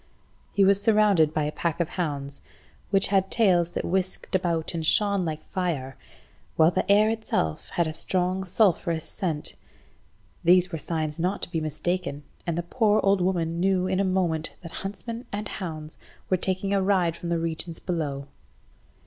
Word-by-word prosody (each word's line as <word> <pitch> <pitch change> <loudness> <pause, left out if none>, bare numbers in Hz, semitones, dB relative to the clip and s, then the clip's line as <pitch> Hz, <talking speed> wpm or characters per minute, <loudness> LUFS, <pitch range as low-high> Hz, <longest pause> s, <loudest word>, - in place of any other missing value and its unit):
He 200 - +3
was 200 +1 +4
surrounded 205 -7 +4
by 155 -1 0
a 150 - -1
pack 170 +1 -2
of 170 -1 0
hounds 140 -5 -2 0.5
which 195 0 +4
had 195 -1 +2
tails 180 -7 +3
that - - -2
whisked 185 +1 -2
about 170 -4 0
and 165 -1 -3
shone 200 +3 +4
like 155 -1 -5
fire, 155 -9 -2 0.6
while 160 +1 +5
the 200 - 0
air 210 +2 +5
itself 220 - -2
had 170 - +2
a 155 - -3
strong 185 +3 0
sulphurous 175 -4 +2
scent. 165 -7 -3 0.9
These 180 +1 +5
were 165 - -4
signs 155 -1 -3
not 180 +4 -1
to - - -2
be 165 -3 -1
mistaken, 155 0 -2 0.2
and 170 -1 -1
the 175 - -1
poor 215 +3 +2
old 195 -1 +3
woman 170 -2 0
knew 185 0 +2
in 185 0 0
a - - +3
moment 180 -4 0
that 165 - -8
huntsman 230 +5 -6
and 210 +1 -3
hounds 155 -6 -7 0.3
were 185 - +4
taking 190 +2 -1
a 200 - +2
ride 185 -4 +2
from 170 - -6
the 170 - +1
regions 165 0 -3
below. 145 -6 -3
175 Hz, 175 wpm, -26 LUFS, 160-195 Hz, 0.9 s, while